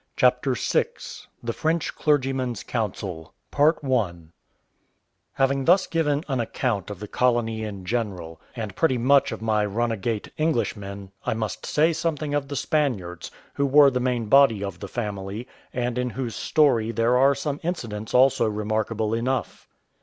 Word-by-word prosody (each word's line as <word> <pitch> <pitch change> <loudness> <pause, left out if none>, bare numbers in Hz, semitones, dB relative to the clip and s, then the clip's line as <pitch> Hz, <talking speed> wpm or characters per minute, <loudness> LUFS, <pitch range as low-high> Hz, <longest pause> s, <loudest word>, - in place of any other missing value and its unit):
CHAPTER 125 0 +3
VI - - +1 0.6
THE 115 0 -2
FRENCH 160 +3 -1
CLERGYMAN'S 130 -5 0
COUNSEL 95 -7 -4 2.0
Having 135 0 +1
thus 185 +2 +5
given 150 -3 0
an 135 -4 -1
account 115 -4 -2
of 100 -3 -7
the 105 - -7
colony 115 -2 +1
in 100 -3 -6
general, 90 -7 -3
and 110 -5 -5
pretty 145 -6 +2
much 135 +4 +4
of 110 0 -6
my 110 -1 +2
runagate 115 +1 -2
Englishmen, 100 -10 -2
I - - -1
must 110 -2 -4
say 160 +3 +3
something 155 -2 -2
of 145 -1 0
the 140 - -5
Spaniards, 120 - -1 0.2
who 140 - 0
were 140 0 +7
the 125 - 0
main 125 -2 0
body 115 -3 +5
of 100 -3 -5
the 100 - -6
family, 105 +1 -5 0.2
and 125 0 -2
in 125 0 -1
whose 120 -1 -4
story 125 -8 +2
there 115 +1 +2
are 135 +2 +5
some 145 +1 -3
incidents 115 - -4
also 130 -2 +5
remarkable 110 +1 -1
enough. 125 +2 -2
120 Hz, 145 wpm, -24 LUFS, 105-140 Hz, 2.0 s, were